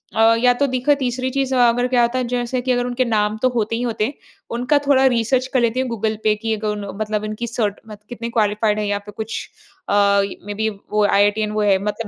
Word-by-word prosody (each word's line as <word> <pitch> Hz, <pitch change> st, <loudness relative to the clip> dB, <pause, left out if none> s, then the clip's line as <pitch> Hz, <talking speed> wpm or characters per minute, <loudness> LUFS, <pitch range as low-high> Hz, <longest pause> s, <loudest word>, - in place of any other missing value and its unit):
अ, 225 Hz, +1 st, +5 dB
या 245 Hz, +1 st, +4 dB
तो 280 Hz, +3 st, +1 dB
दिखो 255 Hz, +2 st, +2 dB
तीसरी 255 Hz, 0 st, -1 dB
चीज़ 270 Hz, 0 st, -1 dB
अगर 245 Hz, 0 st, +3 dB
क्या 250 Hz, -1 st, +2 dB
होता 240 Hz, +2 st, +1 dB
है -, -, 0 dB
जैसे 245 Hz, +1 st, -2 dB
कि 255 Hz, +1 st, -1 dB
अगर 245 Hz, 0 st, +1 dB
उनके 250 Hz, +1 st, 0 dB
नाम 215 Hz, -2 st, 0 dB
तो 255 Hz, -, +3 dB
होते 230 Hz, -2 st, -1 dB
ही 235 Hz, -, -3 dB
होते 230 Hz, -3 st, -1 dB
हैं, 270 Hz, -, -4 dB, 0.4 s
उनका 250 Hz, +5 st, +2 dB
थोड़ा 270 Hz, -1 st, +4 dB
रिसर्च 245 Hz, +2 st, +1 dB
कर 260 Hz, -, +3 dB
लेती 235 Hz, +1 st, +1 dB
हूँ, 260 Hz, -, 0 dB
गूगल 220 Hz, -1 st, -2 dB
पे 215 Hz, -, +4 dB
कि 225 Hz, +1 st, -2 dB
अगर 215 Hz, 0 st, -4 dB
उन 210 Hz, -1 st, -3 dB, 0.2 s
मतलब 215 Hz, -1 st, -2 dB
उनकी 215 Hz, +2 st, -4 dB
सर्ट 215 Hz, -3 st, -2 dB
मत 210 Hz, -1 st, -10 dB
कितनी 235 Hz, -1 st, -5 dB
क्वालिफाइड 210 Hz, -1 st, +1 dB
हैं 210 Hz, -, -1 dB
यहाँ 205 Hz, 0 st, -1 dB
पे 205 Hz, -, -9 dB
कुछ 220 Hz, +1 st, -5 dB, 0.5 s
अ, -, -, +1 dB, 0.5 s
मेबी 205 Hz, +2 st, -2 dB
वो 210 Hz, 0 st, -1 dB
आईआईटीटीएन 205 Hz, +1 st, +2 dB
वो 215 Hz, 0 st, -1 dB
है, 200 Hz, -2 st, +4 dB
मतलब 210 Hz, +2 st, -3 dB
230 Hz, 240 wpm, -20 LUFS, 210-245 Hz, 0.5 s, अ